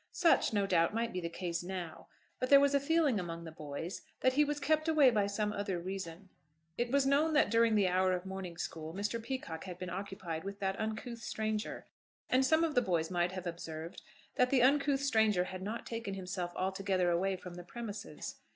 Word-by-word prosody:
Such, 340 -2 +4
no 205 -2 +2
doubt, 175 +1 +2
might 230 0 -1
be 180 - -2
the 170 - -3
case 170 0 -3
now; 175 -2 -6 0.3
but 255 - -1
there 280 - +9
was 280 0 +3
a 280 - +5
feeling 290 -5 +2
among 170 -2 -5
the 165 - -8
boys 155 +3 -6 0.2
that 255 - +4
he 295 +3 +5
was 295 0 -1
kept 310 +2 +1
away 300 -5 +6
by 205 -3 +2
some 210 +1 -1
other 200 -3 -2
reason. 185 0 -6 0.5
It 240 0 -1
was 280 0 +3
known 290 +4 +3
that 295 -8 +4
during 230 -1 +4
the 200 -3 +4
hour 185 +1 +3
of 180 0 -3
morning 190 -3 -6
school 160 -1 -5
Mr. 210 +4 -2
Peacocke 230 -10 -5
had 180 -2 -7
been 180 0 -5
occupied 190 -4 -5
with 200 +1 -6
that 195 0 -1
uncouth 220 +2 -4
stranger, 215 -1 -3 0.5
and 255 +1 +5
some 315 +5 +4
of 325 -2 +1
the 245 - +4
boys 170 -6 0
might 175 0 +1
have 185 -1 -5
observed 165 0 -6 0.4
that 250 - +4
the 255 -2 +4
uncouth 280 +1 +3
stranger 220 -8 +3
had 185 0 -6
not 215 +4 -4
taken 230 -4 -4
himself 180 -2 -4
altogether 190 -1 0
away 190 +3 +1
from 180 -1 -9
the 175 0 -8
premises. 215 +2 -7
200 Hz, 210 wpm, -33 LUFS, 180-245 Hz, 0.5 s, there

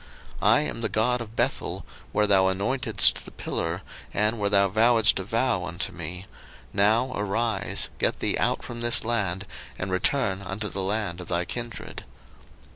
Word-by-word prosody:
01:031:013 - - +2
I - - +6
am 150 - -4
the 110 - 0
God 120 +3 +1
of 110 -1 -8
Bethel, - - -1 0.3
where 105 - +2
thou 95 -2 +4
anointedst 100 +7 +2
the - - -10
pillar, 85 +3 -3 0.3
and 105 +2 +1
where 100 -1 +1
thou 100 -1 +4
vowedst 110 +2 +5
a - - -3
vow 115 -2 0
unto 90 -1 -3
me: 90 +2 -6 0.5
now 110 +6 +3
arise, 110 +3 -1
get - - 0
thee - - 0
out - - +1
from 120 -1 -7
this 120 0 +2
land, 105 -5 -1 0.3
and 95 +1 -4
return 95 0 +1
unto 100 +2 -4
the 95 - -3
land 95 -2 -2
of 90 - -10
thy 90 0 -1
kindred. 120 +2 -6
105 Hz, 170 wpm, -26 LUFS, 95-115 Hz, 0.5 s, I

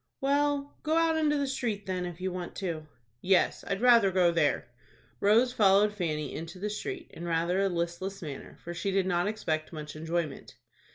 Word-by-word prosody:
"Well, 285 +1 0
go 315 +1 +1
out 330 -1 +3
into 305 -2 +2
the 285 - 0
street 230 -7 -2
then, 185 -1 -2
if 175 -1 -8
you 185 0 -2
want 180 -1 -6
to." 165 -5 -4 0.3
"Yes, 190 0 +2
I'd 195 +1 -2
rather 235 -5 +6
go 180 -2 +3
there." 160 -7 +1 0.5
Rose 230 +5 +4
followed 205 0 +4
Fanny 155 -7 -2
into 165 +3 -7
the 205 +3 -3
street 350 - -5
in 170 - -8
rather 170 +2 +1
a 195 0 +2
listless 175 +3 -3
manner, 145 -4 -8
for 175 - -5
she 195 +3 -2
did 195 -1 +1
not 175 0 +1
expect 160 -7 -2
much 150 -2 -7
enjoyment. 160 -4 -3
190 Hz, 185 wpm, -29 LUFS, 170-220 Hz, 0.5 s, rather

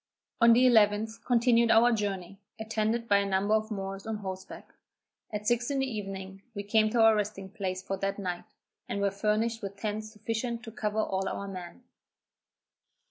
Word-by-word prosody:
On 235 0 +8
the 250 +2 +5
11th, 220 -2 +3
continued 235 -1 +4
our 230 +2 +6
journey, 195 -3 -3 0.2
attended 220 +1 -1
by 200 - +5
a 200 - +1
number 195 +2 +1
of 215 0 +1
Moors 195 -1 -5
on 220 - -2
horseback. 190 -2 -8 0.6
At 210 -1 -4
six 240 +2 +1
in 280 - -1
the 270 - +1
evening 195 -5 -6
we 200 - -4
came 215 +1 +3
to 230 +1 +2
our 225 0 +7
resting 200 -2 -3
place 190 -3 -4
for 195 +1 -3
that 195 +1 -2
night, 180 -3 -4 0.4
and 200 - -2
were 200 0 +1
furnished 215 +3 0
with 200 -1 -6
tents 215 +1 -3
sufficient 225 +2 -3
to 225 - -8
cover 215 0 -1
all 190 -1 -1
our 200 - -5
men. 185 +4 -8
210 Hz, 180 wpm, -29 LUFS, 195-225 Hz, 0.6 s, On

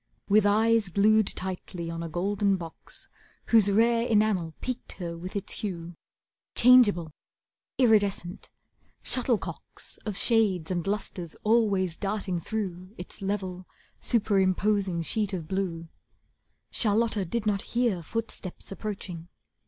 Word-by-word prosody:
With 205 0 +5
eyes 220 0 +3
glued 215 +3 +4
tightly 180 -2 -4
on 165 0 -5
a 165 - -4
golden 195 +4 +1
box, 170 -3 -9 0.4
Whose 220 -3 +5
rare 230 +3 +3
enamel 205 -7 +2
piqued 255 -1 -5
her 170 -2 -5
with 180 +4 -8
its 200 -1 -3
hue, 175 -4 -4 0.6
Changeable, 215 -10 +6 0.7
iridescent, 205 -7 +2 0.5
shuttlecocks 245 -3 -3
Of 210 -3 -3
shades 200 -9 +2
and 175 -1 -2
lustres 195 -5 -4
always 205 -6 +2
darting 195 -3 -2
through 185 0 -5
Its 180 +4 -9
level, 190 -2 -3 0.3
superimposing 195 -4 +1
sheet 205 +3 -1
of 170 -4 -4
blue, 175 -3 -2 0.8
Charlotta 220 -1 +2
did 215 +5 -3
not 205 -2 +1
hear 235 -7 0
footsteps 210 0 -6
approaching. 195 -4 -6
200 Hz, 115 wpm, -27 LUFS, 180-215 Hz, 0.8 s, Changeable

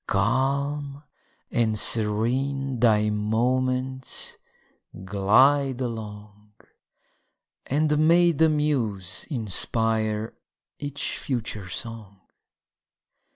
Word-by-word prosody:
Calm 140 +2 -1 0.5
and 110 -2 0
serene 125 +6 +2
thy 105 -2 +3
moments 130 +5 -1 0.7
glide 130 +8 +3
along, 105 -3 -7 1.1
And 150 +2 +1
may 175 +1 +5
the 160 +1 +3
muse 115 - 0
inspire 110 - -1 0.5
each 145 -1 -4
future 110 -7 -4
song! 110 -3 -5
120 Hz, 65 wpm, -24 LUFS, 105-140 Hz, 1.1 s, may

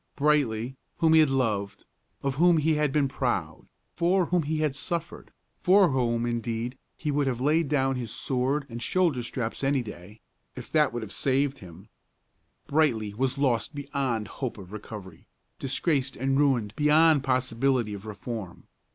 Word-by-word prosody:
Brightly, 135 -4 +1 0.2
whom 160 -1 +4
he 160 - +7
had 155 -2 +5
loved; 105 -7 -1 0.4
of 135 -1 0
whom 170 +4 +4
he 155 +1 +2
had 150 -2 +1
been 145 -1 +2
proud; 110 - -2 0.3
for 180 +2 +2
whom 175 +1 +1
he 155 +1 -2
had 155 -3 0
suffered; 170 +4 -5 0.3
for 190 0 +5
whom, 120 -3 0
indeed, 120 +1 -2 0.2
he 150 - -2
would 145 -1 +1
have 125 -3 -1
laid 150 +4 +2
down 135 -2 +1
his 120 -3 -4
sword 135 +5 -1
and 120 -2 -7
shoulder 165 -2 +1
straps 120 +1 -4
any 135 -1 +2
day, 105 0 -11 0.4
if - - -9
that 150 -3 +3
would 120 -1 -4
have 105 - -8
saved 135 +1 0
him, 90 +2 -13 0.8
Brightly 120 -9 +1
was 130 +4 -1
lost 135 0 +1
beyond 135 -6 -2
hope 130 -5 -5
of 95 -2 -11
recovery, 105 -5 -9 0.3
disgraced 135 0 0
and 135 +2 0
ruined 130 -7 +2
beyond 150 0 +4
possibility 125 -3 +1
of 100 +1 -8
reform. 110 -1 -7
135 Hz, 160 wpm, -27 LUFS, 115-150 Hz, 0.8 s, he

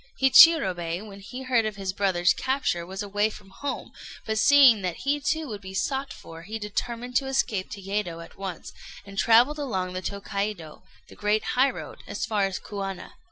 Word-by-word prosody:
Hichirobei, 200 - +6
when 200 -1 -11
he 250 +6 -8
heard 250 -3 +2
of 215 -1 -3
his 195 -1 -4
brother's 180 -4 +2
capture, 260 -11 -1
was 190 +2 -5
away 205 +1 0
from 200 -2 -13
home; 285 +8 -5 0.3
but 220 -1 -1
seeing 260 -3 +7
that 180 -3 -2
he 290 +1 +1
too 300 +2 -1
would 210 -4 -6
be 190 0 -9
sought 270 +8 -2
for, 165 0 -11
he 210 +6 -6
determined 235 +4 -4
to 270 - -1
escape 220 -8 -1
to 205 - -7
Yedo 195 -3 -3
at 165 - -12
once, 190 -4 -7 0.3
and 195 -1 -6
travelled 245 +7 +4
along 190 -10 -2
the 185 - -4
Tôkaidô, 200 -4 -4 0.3
the - - -14
great 210 +1 0
highroad, 265 +2 0
as - - -3
far 210 -3 +1
as 195 -1 -3
Kuana. 195 -2 -6
205 Hz, 185 wpm, -26 LUFS, 190-250 Hz, 0.3 s, seeing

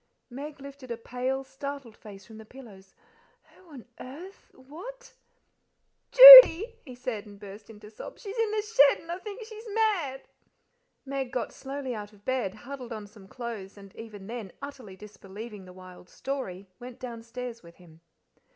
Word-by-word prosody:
Meg 285 +3 -9
lifted 275 -2 -12
a 235 - -5
pale, 255 +3 -4
startled 270 -3 -9
face 200 -2 -14
from 220 +1 -14
the - - -11
pillows. 215 -6 -16 0.5
"Who 370 - -24
on 260 -5 -12
earth 335 +10 -12
what 365 - -13 0.5
" - - -50
"Judy," - - +11
he 255 -5 -12
said, 230 -4 -6
and 205 -1 -15
burst 205 +1 -13
into 210 -1 -14
excited 215 +1 -17
sobs. - - -11
"She's 405 0 -8
in 455 -1 +1
the 425 0 -2
shed, 290 -11 +3
and 330 - -10
I 350 - -5
think 420 +4 -9
she's 440 0 -12
mad!" 355 -12 -1 0.8
Meg 270 -2 -5
got 255 -3 -4
slowly 270 -1 -7
out 210 -1 -9
of 205 0 -23
bed, 250 -7 -2
huddled 250 +2 -10
on 215 -2 -7
some 205 -1 -17
clothes, 220 -4 -9
and 195 -1 -15
even 210 -3 -11
then 220 -3 -8
utterly 270 -9 -10
disbelieving 205 +1 -12
the 180 - -14
wild 185 -1 -15
story, 200 -9 -7
went 245 +1 -11
downstairs 235 0 -8
with 170 0 -17
him. 165 -3 -20
250 Hz, 170 wpm, -27 LUFS, 210-280 Hz, 0.8 s, Judy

